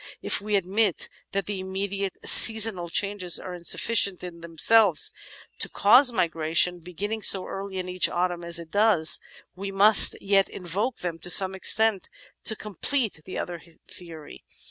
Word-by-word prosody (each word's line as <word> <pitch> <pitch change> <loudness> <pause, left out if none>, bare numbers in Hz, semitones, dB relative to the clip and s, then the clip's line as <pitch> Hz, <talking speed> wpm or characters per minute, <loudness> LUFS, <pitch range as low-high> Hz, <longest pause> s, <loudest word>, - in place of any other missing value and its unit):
If - - -3
we 210 0 -4
admit 195 +1 -2 0.2
that 195 -1 -4
the 205 0 -6
immediate 195 +1 -6
seasonal 220 -6 +6
changes 190 -1 -2
are 185 - -10
insuf 175 -1 0
ficient 200 -5 0
in 170 -2 -11
themselves 170 +2 +2 0.5
to - - -1
cause 250 +6 +4
migration, 170 -2 -1
beginning 200 +6 -7
so 190 -2 +3
early 195 0 -9
in 185 -1 -6
each 180 0 -1
autumn 175 0 -4
as 170 0 -2
it 165 -1 -11
does, 205 -6 +1 0.4
we 195 +1 -8
must 205 +2 +6
yet 195 -1 0
invoke 200 +8 -5
them 170 -2 -6
to 180 - -3
some 190 +1 +3
extent 210 +1 0 0.4
to 220 - +1
complete 215 - -5
the 185 - -9
other 175 -2 -7 0.3
theory. 165 -4 -12
190 Hz, 155 wpm, -23 LUFS, 175-205 Hz, 0.5 s, seasonal